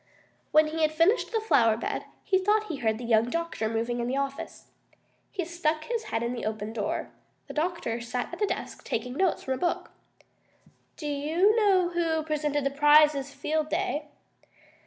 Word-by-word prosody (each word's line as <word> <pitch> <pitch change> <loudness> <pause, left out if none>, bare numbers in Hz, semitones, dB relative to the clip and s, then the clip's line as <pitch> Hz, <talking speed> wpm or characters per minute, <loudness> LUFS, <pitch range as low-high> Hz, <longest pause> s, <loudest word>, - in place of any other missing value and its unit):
When 310 0 +6
he 320 +1 -3
had 310 -1 +3
finished 330 +9 +2
the 450 - +1
flower 230 - +3
bed - - -3 0.2
he 380 -2 +2
thought 425 +2 +1
he 315 - -3
heard 220 -3 0
the 245 - -8
young 230 0 +3
doctor 335 -8 -2
moving 230 +2 -1
in 240 - -1
the 260 +2 -1
office. 275 0 -5 0.6
He 370 -4 -3
stuck 320 -2 -1
his 465 +2 -3
head 225 +1 -2
in 235 +1 -1
the 240 - -5
open 215 0 -3
door. 210 -3 -3 0.3
The - - -9
doctor 305 -8 -2
sat 245 +1 -4
at - - -6
his 415 - +1
desk, - - -5
taking 250 +2 -3
notes 365 +5 +1
from 265 - -1
a - - -3
book. 345 +6 -1 1.1
"Do 310 - -7
you 310 +8 +2
know 390 -5 +4
who 330 -2 0
presented 300 -2 -1
the 275 - 0
prizes 295 -1 +5
Field 310 +1 -2
Day?" 300 +1 -1
300 Hz, 185 wpm, -27 LUFS, 245-345 Hz, 1.1 s, When